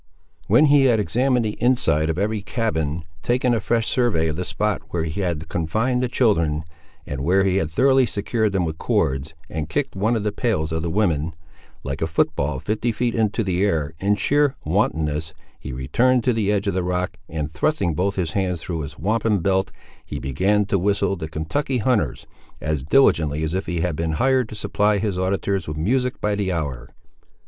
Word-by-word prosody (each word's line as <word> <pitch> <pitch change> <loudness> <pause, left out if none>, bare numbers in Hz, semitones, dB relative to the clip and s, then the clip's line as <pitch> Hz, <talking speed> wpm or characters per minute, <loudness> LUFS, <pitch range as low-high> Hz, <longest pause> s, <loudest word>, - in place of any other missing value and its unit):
When 120 +10 +5
he 145 -2 +5
had 120 -4 +4
examined 125 +3 +1
the 105 0 -4
inside 80 - +2
of 80 - -1
every 105 +2 -1
cabin, 85 - -2 0.2
taken 125 0 +1
a 115 - +1
fresh 115 +2 0
survey 110 -11 +1
of 75 - -2
the 90 - -2
spot 105 +1 -1
where 85 -2 -1
he 80 +4 -3
had 85 -4 -2
confined 110 +12 0
the 125 - +1
children, 85 - +1 0.4
and 65 - -5
where 95 +5 +3
he 95 -1 +2
had 80 -6 0
thoroughly 130 +8 +4
secured 110 +1 0
them 95 -3 0
with 80 -1 -4
cords, 70 +4 0
and 80 0 -4
kicked 130 - -2
one 110 +5 +1
of 110 - -1
the 105 - 0
pails 100 -8 -1
of 80 0 -1
the 85 - -2
woman, 80 -5 0 0.5
like 70 +1 -4
a 80 - +1
foot 80 - +1
ball, - - -1
fifty 110 +3 -1
feet 120 +2 -1
into 110 0 +1
the 95 -1 0
air, 80 -7 0
in 100 +3 +2
sheer 145 +6 +2
wantonness, 80 -3 0 0.2
he - - -7
returned 120 - +2
to 125 - +2
the 105 -3 +1
edge 105 0 0
of 100 - 0
the 95 - 0
rock, 90 +1 -2
and 75 -1 -3
thrusting 145 - 0
both 95 +6 0
his 85 -5 -1
hands 90 -2 -1
through 85 -3 -3
his 75 0 -7
wampum 110 +1 +1
belt, 95 +2 0 0.3
he - - -6
began 100 +10 +1
to 100 -1 0
whistle 100 +1 +1
the 80 -4 -5
"Kentucky 105 - -2
Hunters" 105 - 0 0.3
as 75 -2 -2
diligently 75 - +3
as 80 +1 -2
if 95 +2 -2
he 85 0 -1
had 85 -2 -1
been 80 0 -1
hired 130 +5 +2
to - - -7
supply 105 0 +1
his 100 -2 -1
auditors 95 -1 -1
with 75 0 -4
music 125 +10 0
by 105 - 0
the 100 -2 -1
hour. 70 -7 -3
95 Hz, 205 wpm, -22 LUFS, 80-110 Hz, 0.5 s, When